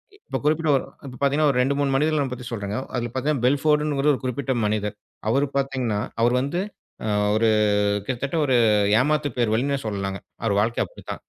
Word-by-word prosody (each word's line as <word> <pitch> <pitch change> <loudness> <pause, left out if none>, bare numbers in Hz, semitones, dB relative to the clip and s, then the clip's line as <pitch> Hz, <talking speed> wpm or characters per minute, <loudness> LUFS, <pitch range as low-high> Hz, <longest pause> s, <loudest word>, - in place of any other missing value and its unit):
இப்ப 405 - -5
குறிப்பிட்ட 155 +1 +1
ஒ - - +5 0.3
இப்ப 125 -2 -8
பாத்தீங்கன்னா 145 +2 +3
ஒரு 125 - -2
ரெண்டு, 135 +2 +2
மூணு 145 -1 +1
மனிதர்களப் 145 -2 +1
பத்தி 125 -1 -8
சொல்றேங்க. 105 -2 -3 0.2
அதுல 120 -1 -2
பாத்தீங்கன்னா 135 -1 -1
பெல்ஃபோர்ட்ன்னு 150 +2 +2
ஒரு 150 +1 +4
குறிப்பிட்ட 130 +1 -1
மனிதர். 105 -1 -1 0.3
அவர் 140 +5 +2
பாத்தீங்கன்னா 130 -6 -1 0.2
அவர் 120 +2 +3
வந்து 140 +7 -2 0.5
அ - - -1 0.3
ஒரு 115 +1 +3 0.6
கிட்டத்தட்ட 135 +5 -3
ஒரு 130 - +2 0.4
ஏமாத்துப் 145 -1 0
பேர்வழின்னே 120 +5 +1
சொல்லலாங்க. 100 -2 -3 0.3
அவர் 105 -3 +1
வாழ்க்க 115 +3 +1
அப்படித்தான். - - -9
130 Hz, 165 wpm, -23 LUFS, 115-145 Hz, 0.6 s, ஒ